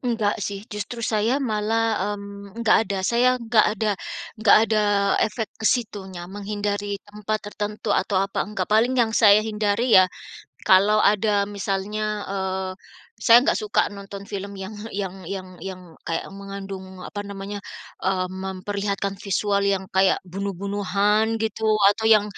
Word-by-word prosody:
Enggak 225 -4 0
sih 200 +1 -4
justru 210 +3 -5
saya 220 +4 +1
malah, 220 -4 0
mmm, 200 +1 -10
enggak 230 -2 +4
ada, 200 - -1
saya 250 +3 +3
enggak 230 -2 +3
ada 215 +2 0 0.5
enggak 215 -2 +7
ada 215 -1 +1 0.4
efek 220 -1 -3
ke 220 - 0
situnya, 195 -7 -2
menghindari 205 +1 -3
tempat 210 +1 -3
tertentu 210 0 -3
atau 190 +1 +1
apa 195 +1 0
enggak 210 - -2
paling 240 +4 +3
yang 225 -2 +2
saya 215 -1 +6
hindari 215 +2 0
ya, 185 - +3 0.6
kalau 200 +3 +6
ada 205 0 +3
misalnya, 200 +1 -3 0.3
eee, 190 -1 -2 0.5
saya 235 0 +8
nggak - - +2
suka 210 - +2
nonton 200 0 -8
film 200 0 -6
yang 190 +2 -6 0.2
yang 195 -2 -4
yang 190 -1 -5 0.2
yang 185 -1 -6 0.3
kayak 165 - -1
mengandung 195 -1 -8
apa 205 - -6
namanya, 200 0 -6 0.5
eee, 185 -1 +1
memperlihatkan 195 +1 -3
visual 200 0 0
yang 195 -1 +1
kayak 190 0 +4
bunuh-bunuhan 200 +3 0
gitu 220 0 -2 0.3
atau 220 +1 -3
yang 215 -2 +6
205 Hz, 140 wpm, -23 LUFS, 195-215 Hz, 0.6 s, saya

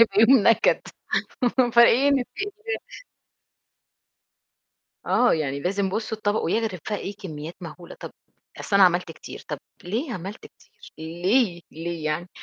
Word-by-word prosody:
هيبقى 215 -2 +5
يوم 230 -1 +6
نكد، 230 - +4 0.9
فإيه 235 +3 +6
نتقي 275 +7 -1
الله. 440 +3 -5 2.3
آه، 245 - +4
يعني 140 -3 -2
لازم 195 +4 0
بُصّوا 220 +3 -3
الطبق، 205 0 0
ويغرف 220 -6 -1
بقى 210 - 0
إيه، 200 +1 -6
كميات 165 -5 -7
مهولة، 170 0 -10
"طب - - -7 0.5
أصل 200 - +1
أنا 195 - +8
عملت 175 -1 +2
كتير." - - -11
"طب - - -3 0.3
ليه 235 - -2
عملت 195 +3 -7
كتير - - -19
ليه؟ 175 +4 +1
ليه 165 0 -5
يعني؟" 155 +3 -2
195 Hz, 135 wpm, -24 LUFS, 170-230 Hz, 2.3 s, أنا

